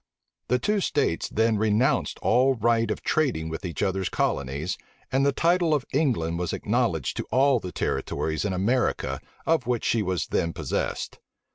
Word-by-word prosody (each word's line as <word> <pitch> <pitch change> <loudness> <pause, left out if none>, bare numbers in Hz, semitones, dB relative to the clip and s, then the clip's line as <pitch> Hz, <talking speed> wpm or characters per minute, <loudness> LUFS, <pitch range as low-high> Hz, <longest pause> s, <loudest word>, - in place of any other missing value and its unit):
The 125 - +3
two 210 - 0
states 140 - 0
then 110 -1 +2
renounced 110 +6 +2
all 130 +2 +4
right 115 0 +2
of 105 - -3
trading 125 - 0
with 80 - -5
each 90 0 -3
other's 95 -1 0
colonies; 70 +6 -1 0.4
and 135 +1 +2
the 140 - +4
title 170 +2 +2
of 140 -3 -2
England 110 - +1
was 90 -2 -2
acknowledged - - 0
to - - -2
all 135 -1 +4
the 90 -4 -6
territories 80 -3 -2
in 100 - -1
America 110 +8 0 0.2
of 160 -7 +1
which 120 -2 0
she 115 - +2
was 95 -3 -1
then 85 0 0
possessed. - - -3
115 Hz, 165 wpm, -26 LUFS, 90-135 Hz, 0.4 s, all